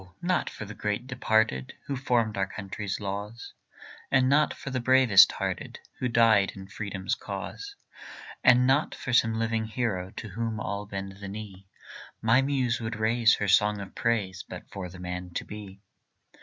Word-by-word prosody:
not 180 Hz, +1 st, +1 dB
for 110 Hz, -, -8 dB
the 105 Hz, -, -8 dB
great 105 Hz, +3 st, -2 dB
departed, 110 Hz, -, +1 dB
Who 140 Hz, -, -3 dB
formed 120 Hz, -5 st, +1 dB
our 95 Hz, -1 st, 0 dB
country's 100 Hz, 0 st, -5 dB
laws, 105 Hz, +3 st, -5 dB, 0.6 s
And 130 Hz, -1 st, +4 dB
not 145 Hz, +3 st, +4 dB
for 140 Hz, -, -7 dB
the 130 Hz, -, -1 dB
bravest 120 Hz, -7 st, +6 dB
hearted, -, -, -4 dB, 0.2 s
Who 125 Hz, -, 0 dB
died 115 Hz, -4 st, +4 dB
in 95 Hz, -1 st, -10 dB
freedom's 100 Hz, -2 st, -3 dB
cause, 255 Hz, -, -6 dB, 0.7 s
And 125 Hz, 0 st, +6 dB
not 135 Hz, +4 st, +2 dB
for 130 Hz, -, -5 dB
some 115 Hz, -2 st, +3 dB
living 115 Hz, -1 st, 0 dB
hero 110 Hz, -5 st, -2 dB
To 110 Hz, -, -6 dB
whom 110 Hz, +2 st, -3 dB
all 100 Hz, 0 st, -4 dB
bend 95 Hz, -1 st, -6 dB
the 100 Hz, 0 st, -8 dB
knee, 100 Hz, -2 st, -8 dB, 0.5 s
My 115 Hz, +4 st, +4 dB
muse 130 Hz, -4 st, 0 dB
would 110 Hz, 0 st, -3 dB
raise 115 Hz, +1 st, +3 dB
her 105 Hz, -, -2 dB
song 105 Hz, +1 st, +4 dB
of 100 Hz, -1 st, -8 dB
praise 100 Hz, -5 st, -1 dB
But -, -, -8 dB
for 95 Hz, -2 st, -6 dB
the 90 Hz, -, -11 dB
man 90 Hz, -1 st, -6 dB
to -, -, -2 dB
be. 100 Hz, -1 st, -10 dB
110 Hz, 170 wpm, -28 LUFS, 100-120 Hz, 0.7 s, bravest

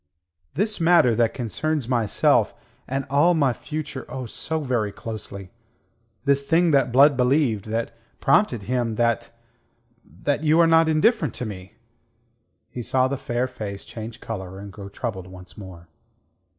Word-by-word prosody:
"This 210 Hz, +5 st, -1 dB
matter 165 Hz, -8 st, +5 dB
that 115 Hz, 0 st, +2 dB
concerns 140 Hz, +3 st, -2 dB
myself; 120 Hz, -5 st, +2 dB, 0.3 s
and 135 Hz, +1 st, -2 dB
all 150 Hz, +6 st, +4 dB
my 140 Hz, -5 st, +2 dB
future, 150 Hz, -1 st, -6 dB
oh, 130 Hz, -1 st, -5 dB
so 160 Hz, +7 st, -3 dB
very 120 Hz, -7 st, -1 dB
closely. 100 Hz, -3 st, -8 dB, 0.7 s
This 140 Hz, 0 st, +3 dB
thing 165 Hz, +4 st, +2 dB
that 135 Hz, -4 st, +3 dB
Blood 140 Hz, +3 st, +6 dB
believed, 125 Hz, -4 st, +2 dB
that 115 Hz, +1 st, -3 dB, 0.2 s
prompted 135 Hz, -, +2 dB
him..., 120 Hz, -1 st, -1 dB
that... 115 Hz, 0 st, 0 dB, 0.9 s
that 145 Hz, +1 st, 0 dB
you 155 Hz, +2 st, +4 dB
are 170 Hz, -, +7 dB
not 165 Hz, 0 st, +4 dB
indifferent 160 Hz, -, +2 dB
to 125 Hz, -, -4 dB
me." 95 Hz, -3 st, -8 dB, 1.0 s
He 125 Hz, -, -5 dB
saw 130 Hz, +2 st, +2 dB
the 140 Hz, -, -2 dB
fair 120 Hz, -1 st, -2 dB
face 105 Hz, -6 st, -7 dB
change 115 Hz, 0 st, -8 dB
colour 95 Hz, -4 st, -6 dB
and 100 Hz, 0 st, -9 dB
grow 100 Hz, -1 st, -9 dB
troubled 100 Hz, -4 st, -5 dB
once 90 Hz, -1 st, -13 dB
more. 90 Hz, -4 st, -11 dB
125 Hz, 150 wpm, -23 LUFS, 110-145 Hz, 1.0 s, are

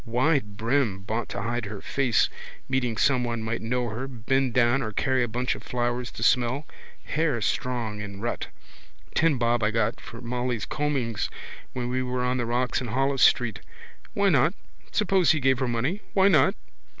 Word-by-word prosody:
Wide 125 Hz, -3 st, +1 dB
brim. 115 Hz, -4 st, 0 dB
Bought 110 Hz, +2 st, -3 dB
to 100 Hz, -, -4 dB
hide 120 Hz, +1 st, -2 dB
her 100 Hz, 0 st, -6 dB
face, 130 Hz, -2 st, +2 dB, 0.4 s
meeting 125 Hz, -4 st, 0 dB
someone 120 Hz, -4 st, +1 dB
might 115 Hz, +1 st, -2 dB
know 120 Hz, +1 st, -1 dB
her, 120 Hz, +5 st, -4 dB
bend 130 Hz, +1 st, 0 dB
down 125 Hz, +2 st, +4 dB
or 110 Hz, -4 st, -3 dB
carry 130 Hz, +4 st, +1 dB
a 120 Hz, -, +1 dB
bunch 125 Hz, +3 st, -1 dB
of -, -, -9 dB
flowers 120 Hz, 0 st, -2 dB
to -, -, -5 dB
smell. 125 Hz, +3 st, +2 dB, 0.4 s
Hair 150 Hz, -6 st, 0 dB
strong 115 Hz, -2 st, -1 dB
in 100 Hz, -1 st, -7 dB
rut. 120 Hz, +3 st, -3 dB, 0.7 s
Ten 160 Hz, -4 st, +3 dB
bob 120 Hz, 0 st, +1 dB
I 105 Hz, -, +2 dB
got 115 Hz, 0 st, 0 dB
for 115 Hz, -, -10 dB
Molly's 120 Hz, -2 st, -2 dB
combings 130 Hz, -8 st, -1 dB, 0.4 s
when 125 Hz, -1 st, -3 dB
we 130 Hz, +1 st, -1 dB
were 125 Hz, 0 st, -1 dB
on 125 Hz, +1 st, +1 dB
the 120 Hz, -2 st, -1 dB
rocks 125 Hz, +2 st, 0 dB
in 125 Hz, -, -4 dB
Holles 135 Hz, +3 st, 0 dB
street. 120 Hz, -4 st, +4 dB, 0.6 s
Why 200 Hz, 0 st, +3 dB
not? 155 Hz, +3 st, +3 dB, 0.4 s
Suppose 195 Hz, -6 st, +3 dB
he 160 Hz, -, 0 dB
gave 130 Hz, -1 st, +2 dB
her 130 Hz, -, 0 dB
money. 125 Hz, -, -1 dB
Why 195 Hz, 0 st, +6 dB
not? 195 Hz, +1 st, +4 dB
125 Hz, 180 wpm, -26 LUFS, 115-135 Hz, 0.7 s, Why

